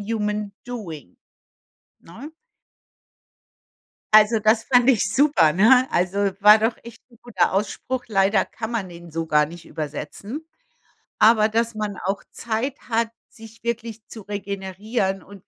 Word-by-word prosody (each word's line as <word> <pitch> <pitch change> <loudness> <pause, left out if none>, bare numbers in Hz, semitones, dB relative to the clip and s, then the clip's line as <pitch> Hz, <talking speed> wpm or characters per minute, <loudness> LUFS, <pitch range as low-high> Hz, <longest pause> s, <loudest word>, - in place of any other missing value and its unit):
human 210 -1 -3
doing“, 170 - -8 0.8
ne? 235 - -11 1.8
Also, 215 +1 +6
das 220 +1 +2
fand 245 0 +4
ich 205 -5 +1
super, 255 - +3
ne? 250 +7 +5
Also, 180 +3 0 0.2
war 210 +2 +7
wirklich 230 +1 -3
'n 235 - -20
guter 200 -6 0
Ausspruch. 245 +5 -2
Leider 195 -1 +2
kann 220 0 -7
man 215 -6 -3
den 170 0 -12
so 165 +1 -3
gar 150 -1 +3
nicht 170 +2 -12
übersetzen. 165 - -7 0.7
Aber, 215 0 +5
dass 230 +1 -1
man 210 -2 -3
auch 195 +1 -2
Zeit 235 +5 -3
hat, 230 0 +1 0.2
sich 225 0 -15
wirklich 230 -2 -4
zu 220 - -10
regenerieren 195 0 -3
und 200 0 -15
215 Hz, 130 wpm, -22 LUFS, 195-230 Hz, 1.8 s, war